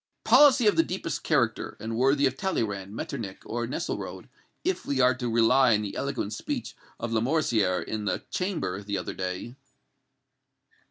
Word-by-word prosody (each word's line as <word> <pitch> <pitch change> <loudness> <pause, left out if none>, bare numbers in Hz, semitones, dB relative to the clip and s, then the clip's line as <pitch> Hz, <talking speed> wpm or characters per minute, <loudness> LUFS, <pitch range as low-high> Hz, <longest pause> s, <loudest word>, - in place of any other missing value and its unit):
"Policy 275 -5 +6
of 210 - +5
the - - +7
deepest 185 - -4
character, 120 -8 0
and 110 +2 -4
worthy 135 +4 +3
of 130 -1 +1
Talleyrand, 105 - -2
Metternich 100 -4 -5
or 120 +1 -3
Nesselrode, 125 - -5 0.3
if 370 +1 -1
we 140 -2 -1
are 125 0 +5
to 125 -1 -3
rely 120 +1 +5
on 105 - -1
the 100 - -5
eloquent 135 -6 -2
speech - - -4 0.2
of 115 - -3
Lamoricière 115 - +1
in 110 -1 -4
the - - -1
Chamber, 175 - -2
the 100 0 -3
other 90 - -4
day." 95 +5 -4
120 Hz, 160 wpm, -27 LUFS, 105-140 Hz, 0.3 s, the